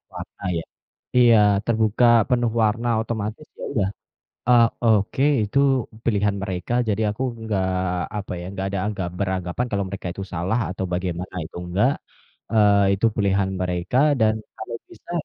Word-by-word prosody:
warna - - -9
ya. 80 - -3 0.5
Iya, 120 -2 +7 0.3
terbuka, 110 +1 +2 0.2
penuh 120 -2 +2
warna, 115 +3 +1
otomatis 110 +4 -4
ya - - -6
udah, 100 -7 +1 0.6
eee, 120 -1 +7 0.2
oke, 110 +3 +2 0.2
itu 105 +7 0 0.5
pilihan 105 -2 +1
mereka 95 +3 -3 0.2
jadi 105 +1 0
aku 110 - -7 0.2
enggak 105 -4 -1 0.5
apa 100 - -5
ya, - - -7
enggak 95 0 -3
ada 100 - -2
anggap 95 -4 -3
beranggapan 95 +4 -1
kalau 100 -1 0
mereka 95 -1 -5
itu 95 - -6
salah 90 +7 0
atau 95 0 -3
bagaimana, 90 0 -3
itu 80 - -10
enggak. 100 +9 +2 0.6
Eee, 105 -2 +5
itu 100 - 0
pilihan 100 -1 +2
mereka 90 +5 -1 0.2
dan 110 0 +4 0.2
kalau 115 +1 -6
bisa - - -13
100 Hz, 150 wpm, -23 LUFS, 95-115 Hz, 0.6 s, Iya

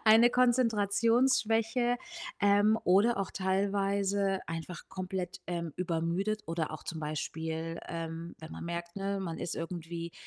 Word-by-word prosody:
eine 225 +2 +8
Konzentrationsschwäche, 235 0 +3 0.4
ähm, 205 +2 +5
oder 200 +6 +4
auch 195 -1 -1
teilweise 195 0 +1
einfach 165 +1 -6
komplett, 185 -1 -4
ähm, 170 -3 -3
übermüdet, 180 +5 -1
oder 165 -1 -1
auch 155 - -7
zum 165 - -5
Beispiel, 160 +2 -3
ähm, 165 0 -5
wenn 160 0 -9
man - - -6
merkt, 170 +1 -5
ne, 195 0 -1
man 170 -3 -3
ist 175 - -3
irgendwie, 170 0 -5
190 Hz, 130 wpm, -31 LUFS, 165-210 Hz, 0.4 s, eine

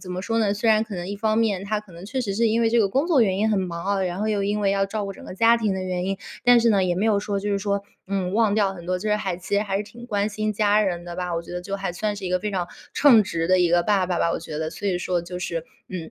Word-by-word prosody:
怎 180 - -9
么 180 - -3
说 225 +1 -1
呢， 210 -3 +2
虽 225 +2 0
然 215 0 +5
可 220 -2 -7
能 175 0 -5
一 205 - -3
方 215 +1 +1
面 205 -5 +1
他 210 +1 -1
可 210 -4 -13
能 170 +3 -11
确 260 +6 -3
实 200 -5 -2
是 230 +1 +2
因 230 +2 +1
为 225 - +3
这 235 0 +4
个 200 - +3
工 270 - +1
作 320 -7 +4
原 190 -3 +1
因 215 +2 +2
很 205 -3 +2
忙 170 -2 -4
啊， 200 -1 0
然 180 0 -2
后 215 - -1
又 205 -2 0
因 205 +1 0
为 200 - +2
要 195 0 +1
照 210 0 -3
顾 195 - -5
整 - - -13
个 - - -8
家 230 +3 +5
庭 215 -4 0
的 190 - -3
原 180 -1 -2
因。 195 0 -1 0.3
但 245 -1 +6
是 230 0 +3
呢， 200 -3 +3
也 180 -1 +1
没 210 +4 +1
有 205 -2 +3
说 200 -1 -2
就 205 +1 -3
是 200 - +1
说， 200 0 -1 0.3
嗯， 190 -2 -1
忘 220 -2 +3
掉 200 -3 +2
很 170 -1 -10
多， 180 0 0
就 210 +3 -3
是 210 - +3
还 190 -5 -3
其 190 +3 -4
实 200 - +3
还 195 -2 -2
是 200 - -1
挺 235 +3 -12
关 205 -2 0
心 215 0 -2
家 210 0 +3
人 175 -3 -2
的 175 - -7
吧。 180 0 -3
我 165 - -2
觉 170 - -10
得 180 - -3
就 195 +2 -4
还 195 -3 -3
算 210 +3 -2
是 195 - -7
一 180 - -3
个 180 - +2
非 210 - -2
常 180 -3 -2 0.3
称 245 -7 +6
职 165 -4 -2
的 185 0 +4
一 175 - +4
个 175 0 +4
爸 195 -3 +2
爸 175 -1 -1
吧， 170 - +1
我 - - -1
觉 150 -1 -6
得。 160 0 -2
所 205 - -4
以 180 -2 0
说 180 0 -1
就 180 +1 -6
是， 170 -2 -3 0.3
嗯， 175 -4 -6
200 Hz, 375 characters per minute, -24 LUFS, 180-215 Hz, 0.3 s, 但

